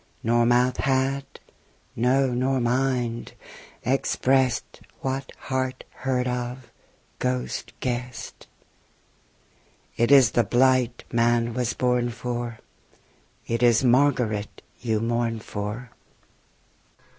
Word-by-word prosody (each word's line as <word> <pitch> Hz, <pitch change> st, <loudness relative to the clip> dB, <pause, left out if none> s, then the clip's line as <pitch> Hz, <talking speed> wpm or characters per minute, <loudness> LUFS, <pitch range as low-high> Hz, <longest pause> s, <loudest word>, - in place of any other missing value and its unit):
Nor 120 Hz, +1 st, +3 dB
mouth 125 Hz, +1 st, +3 dB
had, 135 Hz, +1 st, +1 dB, 0.7 s
no 130 Hz, +2 st, +2 dB
nor 130 Hz, +2 st, +1 dB
mind, 120 Hz, -1 st, 0 dB, 0.5 s
expressed 130 Hz, 0 st, +1 dB, 0.2 s
What 135 Hz, 0 st, -3 dB
heart 130 Hz, -1 st, -2 dB
heard 125 Hz, -1 st, -1 dB
of, 125 Hz, 0 st, -4 dB, 0.5 s
ghost 65 Hz, 0 st, -2 dB
guessed: 125 Hz, -2 st, -5 dB, 1.5 s
It 120 Hz, +2 st, +2 dB
is 135 Hz, -6 st, +7 dB
the 120 Hz, -, +3 dB
blight 125 Hz, +1 st, +2 dB
man 120 Hz, 0 st, +2 dB
was 125 Hz, 0 st, -1 dB
born 125 Hz, -1 st, +1 dB
for, 120 Hz, -1 st, -4 dB, 0.9 s
It 115 Hz, +1 st, -2 dB
is 120 Hz, 0 st, +4 dB
Margaret 125 Hz, -5 st, +2 dB, 0.2 s
you 110 Hz, -3 st, -1 dB
mourn 115 Hz, 0 st, 0 dB
for. 105 Hz, +4 st, -5 dB
125 Hz, 95 wpm, -25 LUFS, 115-130 Hz, 1.5 s, is